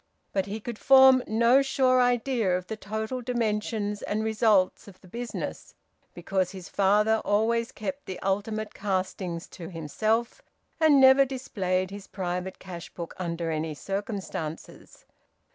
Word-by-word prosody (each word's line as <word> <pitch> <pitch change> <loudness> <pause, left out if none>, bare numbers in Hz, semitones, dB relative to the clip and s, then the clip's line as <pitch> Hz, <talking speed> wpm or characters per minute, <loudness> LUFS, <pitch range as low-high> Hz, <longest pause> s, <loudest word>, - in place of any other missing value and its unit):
But 195 0 0
he 210 +2 -4
could 225 0 -7
form 265 -1 +7
no 235 +5 +4
sure 260 -2 +3
idea 245 -6 +1
of 180 - -7
the 220 - -5
total 220 +4 -4
dimensions 215 -3 -2
and 215 +1 -2
results 215 -4 +2
of 190 -2 -14
the 185 - -18
business, 240 +5 -6 0.4
because 185 +1 -1
his 185 -2 -9
father 210 +3 +3
always 230 +4 +1
kept 275 +5 -6
the 185 - -5
ultimate 210 +3 -2
castings 185 -3 -3
to 170 -3 -9
himself, 215 - -1 0.4
and 310 -3 +5
never 265 +1 +7
displayed 195 -9 -2
his 200 -1 -9
private 180 0 -4
cash 175 -2 -9
book 170 -1 -6
under 170 -2 -3
any 155 0 -3
circumstances. 195 -4 -6
210 Hz, 140 wpm, -27 LUFS, 185-235 Hz, 0.4 s, form